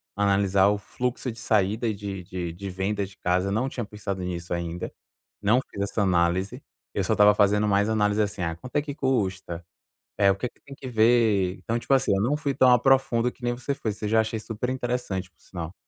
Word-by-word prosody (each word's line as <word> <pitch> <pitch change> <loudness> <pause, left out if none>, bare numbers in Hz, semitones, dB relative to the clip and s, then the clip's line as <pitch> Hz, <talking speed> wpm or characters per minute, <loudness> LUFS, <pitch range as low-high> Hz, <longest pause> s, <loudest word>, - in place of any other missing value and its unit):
analisar 100 -1 +3
o 105 - +1
fluxo 125 +4 -3
de 110 - -11
saída 110 +1 +1
e 110 - 0
de 100 -2 -6
de 90 -2 -5
de 100 +3 -6
venda 95 +2 -2
de 95 +1 -15
casa, 90 +2 0
não 115 +6 0
tinha 120 -4 -4
pensado 100 -2 -5
nisso 85 -1 -4
ainda, 85 0 -4 0.5
não 110 +5 +4
fiz 100 - -6
essa 100 +2 -1
análise, 90 0 +1 0.3
eu - - 0
só - - +1
estava 105 0 +6
fazendo 105 +1 +3
mais 100 +1 +2
análise 105 -1 +2
assim, 105 -2 -2 0.2
quanto 130 - -10
é - - +3
que 145 -1 -6
custa? 95 - -1 0.5
É 100 -1 +5
o 95 - +1
que 125 - -3
que - - -30
tem 140 - -12
que 135 - -10
ver? 110 -5 +3
Então 115 +5 -2
tipo 135 - -3
assim, 135 -4 +2
não 125 +8 +1
fui 145 -2 -2
tão 130 -1 +5
a 125 - +6
profundo 125 -2 +3
que - - -26
nem 120 0 0
você 130 +3 -3
foi, 110 - -3
você 105 +1 -5
já 110 +1 +4
achei 110 0 -2
superinteressante 120 -4 -3
por 85 - -40
sinal. 85 -1 -7
105 Hz, 215 wpm, -26 LUFS, 95-120 Hz, 0.5 s, estava